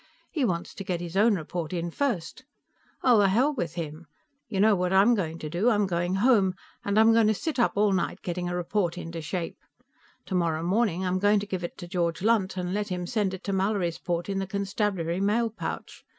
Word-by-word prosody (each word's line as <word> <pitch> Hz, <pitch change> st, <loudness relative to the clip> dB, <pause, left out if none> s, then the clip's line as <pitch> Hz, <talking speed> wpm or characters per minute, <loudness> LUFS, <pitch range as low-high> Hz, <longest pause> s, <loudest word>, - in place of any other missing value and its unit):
He 300 Hz, -, -1 dB
wants 175 Hz, -7 st, -1 dB
to 195 Hz, -, -7 dB
get 180 Hz, -2 st, -2 dB
his 175 Hz, 0 st, -6 dB
own 210 Hz, +2 st, +4 dB
report 165 Hz, -1 st, -4 dB
in 170 Hz, -1 st, -2 dB
first. 245 Hz, -, -2 dB, 0.6 s
Well, 245 Hz, -4 st, +6 dB
the 200 Hz, -1 st, +5 dB
hell 255 Hz, +10 st, +3 dB
with 170 Hz, -, -3 dB
him! 160 Hz, -1 st, -6 dB, 0.4 s
You 200 Hz, -4 st, -2 dB
know 210 Hz, +1 st, +5 dB
what 180 Hz, -1 st, 0 dB
I'm 195 Hz, +5 st, +5 dB
going 165 Hz, -7 st, -1 dB
to 155 Hz, -, -6 dB
do? 175 Hz, +10 st, +1 dB
I'm 210 Hz, -3 st, +3 dB
going 175 Hz, 0 st, -1 dB
home, 200 Hz, -4 st, +3 dB, 0.3 s
and 200 Hz, +1 st, 0 dB
I'm 225 Hz, +1 st, +6 dB
going 225 Hz, -1 st, +5 dB
to 215 Hz, -, +3 dB
sit 305 Hz, +4 st, -3 dB
up 235 Hz, -, +3 dB
all 205 Hz, 0 st, +3 dB
night 185 Hz, -, -2 dB
getting 175 Hz, 0 st, -3 dB
a 175 Hz, -, -2 dB
report 180 Hz, 0 st, -1 dB
into 165 Hz, -1 st, -6 dB
shape. 165 Hz, +2 st, -4 dB, 0.7 s
Tomorrow 170 Hz, -4 st, 0 dB
morning 190 Hz, -1 st, +1 dB
I'm 185 Hz, 0 st, 0 dB
going 205 Hz, +1 st, +4 dB
to -, -, -4 dB
give 185 Hz, -3 st, -4 dB
it 170 Hz, -, -5 dB
to 175 Hz, -, -8 dB
George 170 Hz, -1 st, -1 dB
Lunt 205 Hz, -4 st, +2 dB
and 180 Hz, 0 st, -2 dB
let 205 Hz, 0 st, -1 dB
him 180 Hz, -1 st, -3 dB
send 200 Hz, -2 st, 0 dB
it 190 Hz, -, -12 dB
to 200 Hz, -, -2 dB
Mallorysport 180 Hz, -3 st, -1 dB
in 195 Hz, -1 st, -1 dB
the 195 Hz, -, -3 dB
constabulary 195 Hz, -3 st, -1 dB
mail 225 Hz, +3 st, +1 dB
pouch. -, -, -6 dB
190 Hz, 220 wpm, -27 LUFS, 175-210 Hz, 0.7 s, Well